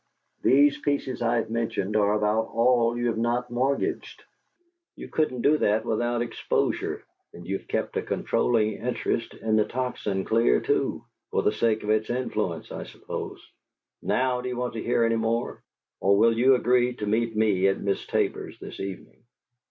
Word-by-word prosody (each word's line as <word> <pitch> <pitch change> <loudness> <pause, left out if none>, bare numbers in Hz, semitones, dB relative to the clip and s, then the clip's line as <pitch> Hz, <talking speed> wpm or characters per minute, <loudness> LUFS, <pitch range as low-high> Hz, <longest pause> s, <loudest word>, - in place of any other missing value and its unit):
These 140 +2 +4
pieces 140 -3 -2
I've 115 -1 0
mentioned 110 -3 -2
are 105 -1 +3
about 105 +1 +1
all 120 0 +2
you 120 - -1
have 115 - -2
not 120 +1 -1
mortgaged. 130 +3 -1 0.7
You - - -9
couldn't 130 -6 -1
do 150 +1 +4
that 110 +2 +1
without 120 +1 0
exposure, 120 - -1 0.3
and 85 - -11
you've 95 +2 -4
kept - - -2
a - - +1
controlling 110 -3 0
interest 120 -1 -2
in 110 -1 0
the 105 - +4
Tocsin 110 -6 -3
clear, 110 - +3
too - - -1 0.2
for - - 0
the - - +3
sake 110 -1 0
of 105 - 0
its 110 0 +1
influence, 110 -9 -2
I - - -6
suppose. - - -7 0.5
Now, 125 -1 0
do 125 - -4
you 125 - -4
want 125 0 -2
to 115 - -4
hear 120 0 +1
any 115 0 +2
more, 115 +1 -1 0.4
or 100 +1 +3
will 115 +2 +4
you 130 +3 +5
agree 125 0 +2
to 105 - -4
meet 115 +2 0
me 105 -3 +3
at 95 - +1
Miss 100 -1 -1
Tabor's - - -1
this - - -9
evening?" 95 -1 -7
115 Hz, 170 wpm, -26 LUFS, 110-125 Hz, 0.7 s, you